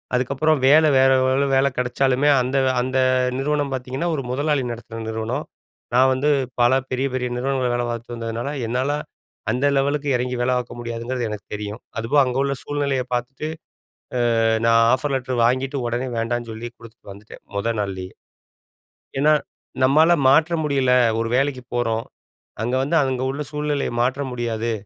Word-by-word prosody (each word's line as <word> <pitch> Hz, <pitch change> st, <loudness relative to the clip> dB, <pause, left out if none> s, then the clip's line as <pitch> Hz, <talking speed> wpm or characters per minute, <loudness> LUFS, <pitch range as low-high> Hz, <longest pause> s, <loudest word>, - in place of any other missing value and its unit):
அதுக்கப்புறம் 140 Hz, +4 st, +1 dB
வேல 155 Hz, +3 st, +6 dB
வேற 135 Hz, 0 st, +5 dB
எவ்வளோ 130 Hz, +2 st, +2 dB
வேலை 135 Hz, +1 st, +3 dB
கிடைச்சாலுமே 130 Hz, +3 st, +1 dB
அந்த 130 Hz, +2 st, -1 dB, 0.2 s
அந்த 130 Hz, +1 st, -1 dB, 0.4 s
நிறுவனம் 145 Hz, 0 st, 0 dB
பார்த்தீங்கன்னா, 130 Hz, +6 st, -3 dB
ஒரு 135 Hz, -, -3 dB
முதலாளி 145 Hz, +1 st, 0 dB
நடத்துன 115 Hz, -1 st, -7 dB
நிறுவனம். 115 Hz, +6 st, -3 dB, 0.5 s
நான் 130 Hz, +1 st, +5 dB
வந்து 135 Hz, +3 st, 0 dB, 0.3 s
பல 120 Hz, +1 st, +5 dB, 0.2 s
பெரிய 130 Hz, +2 st, 0 dB
பெரிய 125 Hz, -1 st, -1 dB
நிறுவனங்கள் 130 Hz, -1 st, 0 dB
வேல 120 Hz, -, 0 dB
பார்த்து 120 Hz, +1 st, -6 dB
வந்ததுனால, 115 Hz, +3 st, -4 dB, 0.2 s
என்னால 130 Hz, +4 st, 0 dB, 0.6 s
அந்த 125 Hz, +3 st, 0 dB
லெவலுக்கு 145 Hz, +2 st, 0 dB
இறங்கி 125 Hz, +1 st, -1 dB
வேல 125 Hz, +1 st, +1 dB
பார்க்க 120 Hz, -1 st, -5 dB
முடியாதுங்கிறது 120 Hz, +1 st, -3 dB
எனக்கு 105 Hz, -3 st, -7 dB
தெரியும். 105 Hz, +1 st, -5 dB, 0.2 s
அதுவும் 115 Hz, +6 st, +2 dB
அங்க 130 Hz, 0 st, -2 dB
உள்ள 140 Hz, 0 st, 0 dB
சூழ்நிலைய 140 Hz, -2 st, -1 dB
பார்த்துட்டு, 125 Hz, +5 st, -3 dB, 0.9 s
அ -, -, +2 dB, 0.2 s
நான் 115 Hz, 0 st, +5 dB
ஆஃபர் 140 Hz, +3 st, 0 dB
லெட்டர் 130 Hz, -1 st, -2 dB
வாங்கிட்டு, 130 Hz, +3 st, 0 dB
உடனே 120 Hz, +2 st, -2 dB
வேண்டான்னு 120 Hz, +1 st, -2 dB
சொல்லி 110 Hz, +2 st, -6 dB
குடுத்துட்டு 115 Hz, -2 st, -15 dB
வந்துட்டேன், 100 Hz, +2 st, -13 dB
முதல் 110 Hz, +3 st, -1 dB
நாள்லேயே. 95 Hz, -2 st, -4 dB, 1.1 s
ஏனா, 150 Hz, +2 st, +5 dB, 0.5 s
நம்மால 155 Hz, +6 st, +5 dB, 0.2 s
மாற்ற 160 Hz, +5 st, +4 dB
முடியல 135 Hz, -4 st, +1 dB, 0.3 s
ஒரு 115 Hz, 0 st, -1 dB
வேலைக்கு 135 Hz, -1 st, 0 dB
போறோம். 115 Hz, -2 st, 0 dB, 0.6 s
அங்க 120 Hz, +3 st, 0 dB
வந்து 150 Hz, +5 st, 0 dB
அங்க 130 Hz, -1 st, -1 dB
உள்ள 140 Hz, +2 st, -5 dB
சூழ்நிலையை 150 Hz, -1 st, -1 dB
மாற்ற 130 Hz, +3 st, 0 dB
முடியாது. 115 Hz, -1 st, -2 dB
130 Hz, 150 wpm, -22 LUFS, 120-140 Hz, 1.1 s, வேல